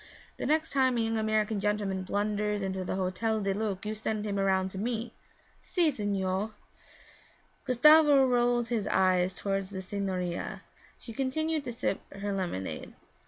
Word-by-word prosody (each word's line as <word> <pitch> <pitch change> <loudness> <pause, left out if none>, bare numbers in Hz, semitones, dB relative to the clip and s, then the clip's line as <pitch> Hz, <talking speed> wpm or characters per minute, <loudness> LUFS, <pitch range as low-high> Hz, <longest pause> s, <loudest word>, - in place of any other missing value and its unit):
'The - - -3
next 315 +2 +1
time 260 -3 +2
a - - +2
young 225 0 0
American 215 -1 +1
gentleman 205 -2 -1
blunders 205 +1 -1
into 190 -1 -2
the 185 - -3
Hotel 190 +4 0
du 195 -1 0
Lac 205 -1 -3
you 215 - -2
send 215 0 -3
him 200 -1 -1
around 190 -1 +2
to 190 - -6
me.' 235 +2 -2 0.5
'Si, 340 -4 +1
signore.' 205 -2 -1 1.1
Gustavo 290 +2 +6
rolled 245 -1 +2
his 225 -4 -1
eyes 185 -1 +2
toward 195 -1 -1
the 190 0 -6
signorina; 185 -3 -3 0.3
she 230 - -9
continued 305 +5 -1
to 245 - -3
sip 230 -4 -2
her 200 +1 -4
lemonade. 175 - -4
210 Hz, 155 wpm, -29 LUFS, 190-240 Hz, 1.1 s, Gustavo